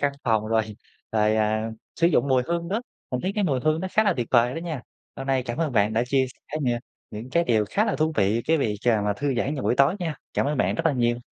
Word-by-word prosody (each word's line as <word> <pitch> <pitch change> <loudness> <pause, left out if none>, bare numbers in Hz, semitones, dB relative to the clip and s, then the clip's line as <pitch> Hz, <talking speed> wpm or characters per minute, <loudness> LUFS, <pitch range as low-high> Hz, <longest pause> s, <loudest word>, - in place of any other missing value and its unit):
căn 140 -1 +1
phòng 110 -2 +2
rồi 110 0 +2 0.5
rồi, 110 0 +3
à, 110 +1 0 0.3
sử 170 - +4
dụng 150 -4 +2
mùi 130 -2 +3
hương 170 0 -2
đó, 210 +6 -1 0.3
mình 125 -1 -1
thấy 190 - -2
cái 210 - +1
mùi 135 -7 +1
hương 155 +3 +1
nó 190 - -3
khá 215 - +4
là 205 - +4
tuyệt 120 -2 -1
vời 120 0 +4
đó - - -3
nha. 160 -7 -5 0.3
Hôm 135 - -6
nay 135 -1 +1
cảm 120 +3 -5
ơn 155 -5 0
bạn 105 -1 +2
đã 115 +2 +1
chia 130 0 +2
sẻ 155 - -7
nh 140 - -1 0.4
những 110 +4 -8
cái 170 +5 +2
điều 110 -7 +2
khá 210 - +2
là 215 - -1
thú 155 +1 +1
vị, 105 +4 +2
cái 165 - +4
việc, 105 -6 0
ờ, 110 -4 +3
mà 105 0 +1
thư 140 +1 -1
giãn 135 +5 0
vào 135 - -4
buổi - - +2
tối 140 +5 +4
nha. 165 -4 -2 0.2
Cảm - - +1
ơn 150 - 0
bạn - - +2
rất 165 0 0
là - - +3
nhiều. 120 -2 +1
130 Hz, 285 wpm, -25 LUFS, 115-160 Hz, 0.5 s, sử